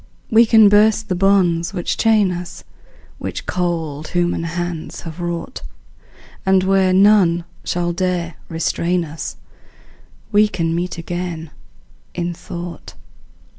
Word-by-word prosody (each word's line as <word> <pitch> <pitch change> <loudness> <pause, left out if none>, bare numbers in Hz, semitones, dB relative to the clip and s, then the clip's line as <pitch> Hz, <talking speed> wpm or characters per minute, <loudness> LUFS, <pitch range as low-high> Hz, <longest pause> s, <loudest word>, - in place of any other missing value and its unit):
We 230 +1 +6
can 220 -2 +7
burst 215 +2 +4
the 185 - 0
bonds 180 -2 +2
which 175 - -1
chain 215 -4 +3
us, 175 0 -7 0.6
Which - - -5
cold 165 -4 -2
human 175 -1 0
hands 175 -1 -4
have 165 +1 -8
wrought, 175 - -4 0.8
And 190 -1 +3
where 190 -1 +3
none 185 -3 +4 0.2
shall 175 0 -1
dare 175 -2 -1 0.2
restrain 170 +1 0
us 155 +1 -6 1.0
We 210 0 +5
can 165 -5 -2
meet 175 +1 -2
again, 170 -2 -5 0.6
in 175 0 -2
thought. 175 0 -8
175 Hz, 120 wpm, -19 LUFS, 170-195 Hz, 1.0 s, can